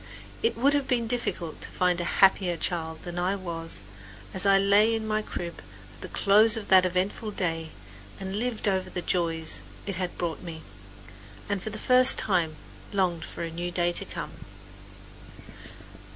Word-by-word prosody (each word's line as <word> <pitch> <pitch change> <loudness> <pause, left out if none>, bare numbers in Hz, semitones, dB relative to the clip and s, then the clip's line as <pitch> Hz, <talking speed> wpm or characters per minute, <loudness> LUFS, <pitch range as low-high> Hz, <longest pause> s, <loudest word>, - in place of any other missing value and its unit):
It 230 - +1
would 275 +4 +3
have 285 -2 +1
been 245 -3 +1
difficult 225 -8 -2
to - - -4
find 180 -1 +1
a 170 - -3
happier 185 -3 +1
child 160 -1 -3
than 175 0 -5
I 185 +3 +1
was 165 - -5 0.5
as 190 +1 -1
I 195 0 +6
lay 205 +3 +4
in 220 -1 -3
my 215 0 +1
crib 170 -4 -6 0.3
at - - -18
the - - -6
close 215 +3 +4
of 215 - -6
that 185 -1 +7
eventful 185 +5 -1
day 165 -5 -2 0.5
and 190 +2 -3
lived 235 -3 -2
over 190 -1 +1
the 180 -1 -4
joys 165 -2 0 0.2
it 195 -3 -3
had 180 -1 -3
brought 165 -4 -3
me, 160 -3 -8 0.8
and 200 -2 -1
for 215 - -4
the 215 - -6
first 255 +3 +5
time 170 -6 +1 0.4
longed 180 -4 0
for - - -6
a 165 - -4
new 175 +2 -3
day 175 0 +1
to - - -2
come. - - -6
185 Hz, 175 wpm, -27 LUFS, 170-210 Hz, 0.8 s, that